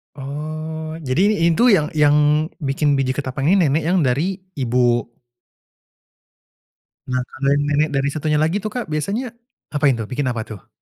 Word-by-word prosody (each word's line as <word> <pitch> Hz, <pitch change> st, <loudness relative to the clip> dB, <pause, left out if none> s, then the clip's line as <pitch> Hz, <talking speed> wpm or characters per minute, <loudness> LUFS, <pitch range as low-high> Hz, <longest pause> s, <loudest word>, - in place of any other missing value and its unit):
Oh, 155 Hz, +3 st, -5 dB
jadi 130 Hz, +5 st, 0 dB
in 170 Hz, -2 st, +3 dB
ini -, -, +2 dB
tuh 240 Hz, -, +5 dB
yang 155 Hz, -5 st, +3 dB
yang 150 Hz, 0 st, +3 dB, 0.2 s
bikin 145 Hz, +1 st, +1 dB
biji 135 Hz, -1 st, 0 dB
ketapang 135 Hz, +1 st, -1 dB
ini 190 Hz, -4 st, +4 dB
nenek 145 Hz, +3 st, +1 dB
yang 180 Hz, +3 st, +2 dB
dari 160 Hz, +8 st, 0 dB, 0.2 s
ibu? 120 Hz, -2 st, 0 dB, 1.9 s
Nah, 125 Hz, 0 st, 0 dB
kalau 140 Hz, +1 st, 0 dB
nenek 145 Hz, +1 st, +1 dB
dari 135 Hz, +1 st, +1 dB
satunya 155 Hz, 0 st, -1 dB
lagi 165 Hz, +6 st, +1 dB
tuh, 210 Hz, -, -4 dB
Kak, 240 Hz, +2 st, -4 dB
biasanya 200 Hz, -, -2 dB, 0.4 s
ngapain 145 Hz, -2 st, +2 dB
tuh 115 Hz, -2 st, -5 dB
bikin 135 Hz, +1 st, -1 dB
apa 120 Hz, -3 st, -2 dB
tuh? 105 Hz, -5 st, -11 dB
150 Hz, 160 wpm, -20 LUFS, 135-160 Hz, 1.9 s, tuh